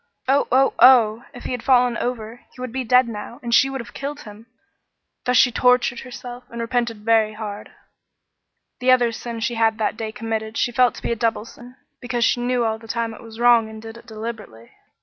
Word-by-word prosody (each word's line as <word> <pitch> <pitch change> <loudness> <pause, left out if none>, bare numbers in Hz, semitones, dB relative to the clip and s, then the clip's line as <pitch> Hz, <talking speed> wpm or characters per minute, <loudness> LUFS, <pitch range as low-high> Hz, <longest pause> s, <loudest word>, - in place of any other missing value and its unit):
Oh, 275 +2 +2
oh, 265 +2 +4
oh! 240 -2 +6
If 245 - -12
he - - -5
had 250 -2 -3
fallen 250 -2 +3
over, 235 -2 -4 0.2
he - - -16
would 255 -1 -5
be 260 +2 -3
dead 250 +1 +4
now, 230 +2 -8
and 235 -1 -3
she 270 - +5
would 270 0 -5
have 235 - -13
killed 285 +2 -6
him! 215 -1 -13 0.8
Thus 250 0 +2
she 250 - +5
tortured 250 -1 +2
herself, 245 -1 -9
and 235 - -8
repented 230 -2 -2
very 220 -1 +3
hard. 210 -1 -7 1.1
The 255 0 0
other 245 -2 +4
sin 230 0 -7
she 240 +2 -1
had 225 -1 +1
that 220 - -1
day 220 -1 -4
committed 225 -1 -4
she 240 - 0
felt 250 +1 +3
to - - -11
be - - -2
a - - +1
double 225 -1 -1
sin, 245 +2 -14 0.2
because 245 -2 -1
she 240 - +1
knew 245 -1 0
all 220 0 -1
the 225 - -14
time 230 0 -2
it - - -12
was 225 0 -12
wrong 235 -2 +4
and 220 0 -10
did 225 +1 -10
it 235 +1 -15
deliberately. 215 - -8
235 Hz, 220 wpm, -21 LUFS, 225-250 Hz, 1.1 s, oh